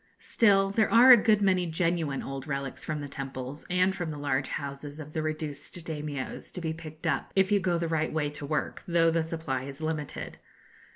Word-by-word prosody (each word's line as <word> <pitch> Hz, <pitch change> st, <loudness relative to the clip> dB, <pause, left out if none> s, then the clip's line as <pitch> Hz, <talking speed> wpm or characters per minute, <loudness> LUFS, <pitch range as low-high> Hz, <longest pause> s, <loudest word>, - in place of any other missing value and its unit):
Still, 195 Hz, -3 st, +3 dB
there 215 Hz, +1 st, +2 dB
are 245 Hz, +3 st, +9 dB
a -, -, +13 dB
good 210 Hz, -2 st, +4 dB
many 185 Hz, -2 st, +3 dB
genuine 165 Hz, -4 st, 0 dB
old 135 Hz, +1 st, -6 dB
relics 140 Hz, -2 st, -4 dB
from 150 Hz, -1 st, -3 dB
the 145 Hz, -, -5 dB
temples, 135 Hz, 0 st, -5 dB
and 185 Hz, +1 st, +2 dB
from 175 Hz, -3 st, -3 dB
the 150 Hz, -, -5 dB
large 140 Hz, -1 st, 0 dB
houses 145 Hz, +1 st, -5 dB
of 150 Hz, 0 st, -9 dB
the 160 Hz, -, -1 dB
reduced 155 Hz, -2 st, -4 dB
Daimios, 150 Hz, -4 st, -5 dB
to -, -, -4 dB
be 160 Hz, -2 st, -2 dB
picked 160 Hz, -1 st, -10 dB
up, -, -, 0 dB
if 195 Hz, +1 st, +3 dB
you 205 Hz, -, +5 dB
go 180 Hz, -2 st, +1 dB
the 170 Hz, 0 st, -1 dB
right 160 Hz, -1 st, 0 dB
way 150 Hz, -2 st, -1 dB
to 150 Hz, -, -8 dB
work, 145 Hz, +1 st, -2 dB
though 165 Hz, -1 st, +4 dB
the 165 Hz, 0 st, +2 dB
supply 160 Hz, -5 st, -3 dB
is 135 Hz, +1 st, -7 dB
limited. 155 Hz, -2 st, -4 dB
155 Hz, 210 wpm, -28 LUFS, 145-175 Hz, -, a